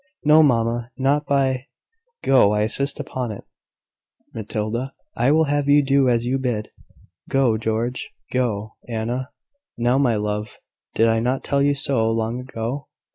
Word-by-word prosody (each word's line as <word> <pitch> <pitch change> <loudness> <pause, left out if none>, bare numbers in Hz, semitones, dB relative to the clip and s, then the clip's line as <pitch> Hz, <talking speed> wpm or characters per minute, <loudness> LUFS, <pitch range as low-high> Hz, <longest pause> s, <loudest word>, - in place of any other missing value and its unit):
"No, 155 +1 +6
mamma; 120 -4 +1
not 140 +2 +1
by 135 -2 +1 0.3
" 470 +1 -49
"Go, 125 -6 +5
I 105 0 +2
insist 140 +6 -1
upon 125 -3 -4
it, 105 - -8 0.9
Matilda. 110 +4 -3 0.2
I 120 +3 +2
will 160 +1 +4
have 145 -1 0
you 145 0 +6
do 135 -1 +3
as 120 -1 +1
you 130 +2 +1
are - - -5
bid. 115 -5 -2 0.6
Go, 135 -4 +3
George: 115 +3 -2 0.2
go, 110 -4 -1
Anna. 120 +3 -3 0.5
Now, 120 +3 +2
my 125 -5 +3
love, 105 0 -3 0.4
did 115 - +4
I 115 0 +2
not 125 +3 -1
tell 140 0 +1
you 145 0 +3
so, 130 -5 +1
long 115 +2 -1
ago? 125 +2 -5
125 Hz, 160 wpm, -22 LUFS, 115-140 Hz, 0.9 s, No